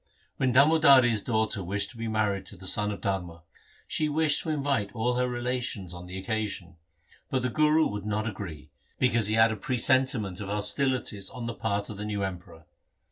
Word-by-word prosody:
When 130 -2 +1
Damodari's 135 -5 +6
daughter 110 -3 0
was 100 +3 -1
to 100 - -11
be 115 0 -4
married 105 -3 -1
to 100 - -7
the 95 - -8
son 105 +3 +2
of 100 - -7
Dharma, 90 -4 -3 0.4
she 155 -1 0
wished 150 -1 +2
to 160 - -5
invite 140 -9 0
all 120 +1 0
her 125 0 0
relations 120 -6 -3
on 90 0 -9
the 90 +1 -6
occasion, 100 -3 -3 0.5
but 130 -2 -1
the 125 - +1
Guru 155 +3 +3
would 105 0 -4
not 105 +1 -1
agree, 90 -8 -7 0.3
because 115 -4 +2
he 110 - +1
had 110 0 +5
a - - -2
presentiment 125 -3 +1
of 100 - -5
hostilities 105 0 0
on 120 -2 -7
the 120 - -3
part 100 0 -2
of 105 - -8
the 105 - -5
new 105 -2 -2
Emperor. 90 -4 -7
110 Hz, 190 wpm, -27 LUFS, 100-125 Hz, 0.5 s, Damodari's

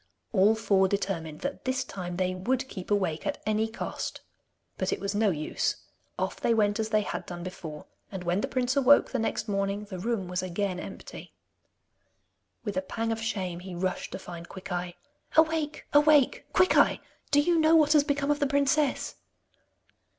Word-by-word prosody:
All 210 +2 +5
four 195 -3 +3
determined 185 -6 -2
that 275 +1 -4
this 260 0 0
time 180 -2 -6
they 185 0 0
would 255 +8 -1
keep 185 -8 -8
awake 190 -6 0
at 295 - -1
any 215 +1 +1
cost. 225 - -5 0.6
But - - 0
it - - -1
was 200 0 -2
no 210 0 +3
use. 155 -4 -1 0.4
Off - - -3
they 230 - +3
went 205 0 +2
as 220 0 -1
they 215 -1 +3
had - - -4
done 175 -1 -6
before, 165 -4 -7 0.3
and 190 -2 -5
when 175 +3 +1
the - - -1
prince 255 0 0
awoke 280 +1 +5
the 260 - -1
next 220 0 -1
morning 200 0 -1
the 190 -3 -7
room 215 -2 -1
was 180 +1 -2
again 185 0 -2
empty. - - -9 1.3
With 205 -4 -3
a - - +2
pang 225 +4 -3
of 225 0 -2
shame, 185 -6 -2
he 180 0 -8
rushed 185 +1 -2
to - - -3
find 170 -2 -9
Quickeye. 180 -2 -5 0.4
'Awake! 315 -1 +2
Awake! 295 -2 +4
Quickeye! 370 - +4 0.3
Do 290 - +4
you 335 +3 +3
know 315 +1 +5
what 305 -1 +5
has 300 -2 +6
become 285 -1 0
of 290 - +1
the 285 - +2
princess? 280 0 +1
210 Hz, 180 wpm, -28 LUFS, 185-270 Hz, 1.3 s, has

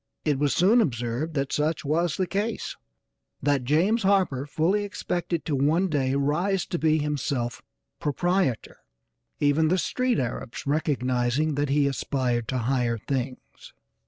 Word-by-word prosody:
It 145 -3 +1
was 145 -1 +1
soon 210 +7 +5
observed 125 - -2
that 140 -1 -1
such 150 +1 0
was 165 +2 +1
the 185 - +1
case; 205 +5 -2 0.7
that 140 -3 +2
James 175 - +2
Harper 185 -9 +2
fully 175 +8 +1
expected 175 -4 -3
to 150 - 0
one 160 +8 +2
day 135 -3 0
rise 170 +7 +1
to 175 - -2
be 155 -1 +3
himself 140 -5 -2 0.4
proprietor; 170 - 0 0.6
even 145 +2 +3
the 180 +4 +2
street 250 +6 0
Arabs 125 -1 -4
recognizing 140 -1 0
that 145 0 -1
he 145 +1 +3
aspired 125 -4 -1
to 130 - -1
higher 120 -1 0
things. 130 +2 -5
145 Hz, 140 wpm, -26 LUFS, 130-175 Hz, 0.7 s, soon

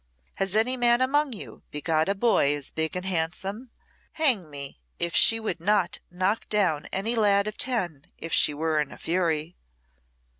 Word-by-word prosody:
"Has 195 0 -1
any 245 +4 +3
man 240 -1 +4
among 280 +2 +2
you 210 - -10
begot 155 +3 0
a 200 - +1
boy 195 -10 +3
as 145 -2 -6
big 160 +1 -2
and 180 0 -3
handsome? 190 +7 -3 0.4
Hang 245 - +1
me! 140 - -7 0.2
if 170 0 -1
she 225 - +6
would 215 -6 -3
not 205 +1 +1
knock 185 +5 -1
down 185 -8 +1
any 220 +5 -1
lad 200 -2 +3
of 215 0 -4
ten 180 - -1
if 165 - -6
she - - +5
were 155 +1 0
in 145 - -5
a - - -11
fury." 165 -1 -1
190 Hz, 175 wpm, -26 LUFS, 160-220 Hz, 0.4 s, she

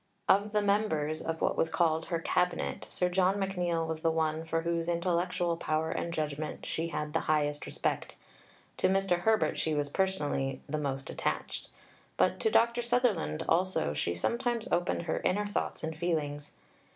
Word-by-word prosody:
Of 205 +2 +4
the 210 0 +2
members 160 -7 +1
of 165 0 -3
what - - +2
was 165 - +1
called 160 -1 +2
her 170 - -1
"Cabinet," 180 +2 0
Sir 180 - +1
John 185 +1 +3
McNeill 180 -4 0
was 160 -1 -3
the 165 - +3
one 160 0 0
for 165 0 -1
whose 170 0 -1
intellectual 175 0 0
power 160 -1 0
and 170 - -2
judgment 155 -1 -3
she 165 +1 -2
had 150 -2 -3
the 160 - +2
highest 150 -1 +1
respect, - - -2 0.6
to - - +3
Mr. 190 -2 +2
Herbert 220 +4 +2
she 155 -1 0
was 145 -1 0
personally 145 -7 0
the 155 +1 -2
most 135 -2 -3
attached, - - -3 0.5
but - - +2
to 440 - +2
Dr. 235 - +3
Sutherland 235 - +1
also 175 - +2
she 85 +4 -1
sometimes 235 - -1
opened 175 0 +1
her 160 - -1
inner 205 +3 +1
thoughts 205 - -3
and 160 0 -3
feelings. 150 -3 -2
170 Hz, 170 wpm, -31 LUFS, 155-190 Hz, 0.6 s, Of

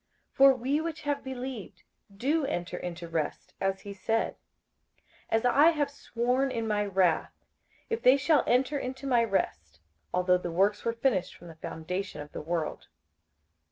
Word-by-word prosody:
58:004:003 - - -35
For 275 0 +8
we 265 +5 0
which 325 0 -4
have 290 -1 -1
believed 260 -4 -6 0.3
do 290 +8 +1
enter 175 -6 -3
into 170 -1 -6
rest, 165 -2 -3
as 195 0 0
he 200 - -7
said, 225 +3 -1 0.9
As 225 +2 +1
I 285 +6 +6
have 300 -4 0
sworn 250 0 0
in 230 -3 -2
my 210 -1 +1
wrath, 185 -4 +1 0.4
if 455 -1 -2
they 255 +2 +6
shall 290 +1 +3
enter 265 +4 +2
into 265 +2 -5
my 245 -3 +3
rest: 80 - -2 0.3
although 180 0 +3
the 175 - -4
works 200 +5 +2
were 230 - 0
finished 230 -7 0
from 175 - -13
the 165 - -11
foundation 180 +2 -4
of 150 0 -8
the - - -6
world. 165 0 -3
225 Hz, 165 wpm, -29 LUFS, 180-270 Hz, 0.9 s, For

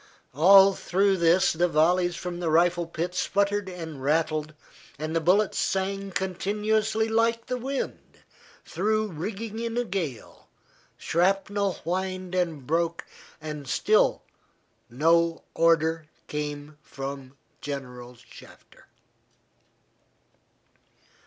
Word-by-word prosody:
All 195 +7 +7
through 195 +1 +1
this 175 +3 +3
the 175 +2 +2
volleys 175 +2 +2
from 175 0 -5
the 170 -2 -1
rifle 170 +1 +2
pits 175 +2 -3
sputtered 200 0 0
and 160 -6 -8
rattled, 155 +1 0 0.4
and 155 +3 -4
the 165 - +2
bullets 190 +5 +2
sang 195 +1 -1
continuously 210 +4 -1
like 230 +1 +1
the 250 0 -3
wind 270 +3 -5 0.5
through 215 0 0
the - - -10
rigging 210 +6 -5
in 230 0 -3
a 245 - +2
gale, 175 - -5 0.5
shrapnel 195 +3 0
whined 185 +1 -3
and 165 -7 -1
broke, 165 +3 -1 0.3
and 150 -2 -7
still - - +2 0.7
no 165 +6 +2
order 165 -1 +2 0.2
came 150 0 -5
from 135 -2 -8 0.2
General 125 -3 -7
Shafter. - - -17
175 Hz, 105 wpm, -26 LUFS, 155-195 Hz, 0.7 s, All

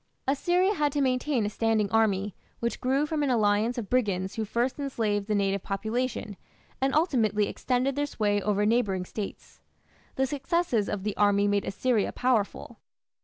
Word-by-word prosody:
Assyria 355 +8 +2
had 295 -6 +1
to 295 - 0
maintain 255 -2 +1
a - - 0
standing 225 -1 +1
army, 205 -3 +2 0.3
which 235 0 -2
grew 270 +3 +2
from 300 0 -2
an 285 - +1
alliance 220 +1 +2
of 225 -4 -3
brigands 195 -6 0
who 225 - -2
first 240 +6 -1
enslaved 215 -7 -1
the 215 - +1
native 195 -1 +1
population, 220 +1 -3 0.4
and 270 +1 +1
ultimately 220 - +2
extended 255 +1 -1
their 290 0 0
sway 205 -6 0
over 205 0 +1
neighbouring 210 -5 +1
States. 205 +1 -7 0.6
The 265 - +2
successes 275 - 0
of 200 -2 -3
the 210 -1 -2
army 205 0 +3
made 205 0 +1
Assyria 230 0 0
powerful. 245 -5 -1
225 Hz, 165 wpm, -27 LUFS, 205-265 Hz, 0.6 s, army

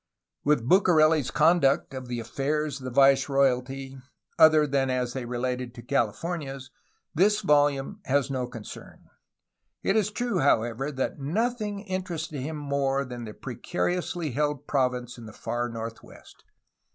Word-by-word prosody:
With 145 -5 +2
Bucareli's 155 -5 +4
conduct 155 -4 +3
of 130 -1 -6
the 120 -1 -3
affairs 140 +4 -2
of 130 - -10
the - - -2
viceroyalty 135 0 +2 0.4
other 155 -1 +7
than 135 -2 0
as 125 -1 -1
they 130 -2 -4
related 125 0 -3
to 120 - -9
the - - -21
Cahfornias 135 - -2 0.4
this 205 +6 +3
volimae 145 +4 +2
has 140 0 +1
no 130 -2 -2
concern. 115 -4 -11 0.8
It 195 - +1
is 215 -2 +2
true, 225 -3 -1
however, 125 +1 +1
that 135 +1 -3
nothing 210 - -1
interested 180 -6 -4
him 155 +3 -4
more 140 -1 0
than 120 -2 -7
the 105 - -8
precariously 175 +4 -3
held 145 +1 -1
province 125 -3 -1
in 115 - -10
the 110 - -11
far 120 +2 -3
north 115 0 -6
west. - - -17
135 Hz, 145 wpm, -27 LUFS, 125-155 Hz, 0.8 s, other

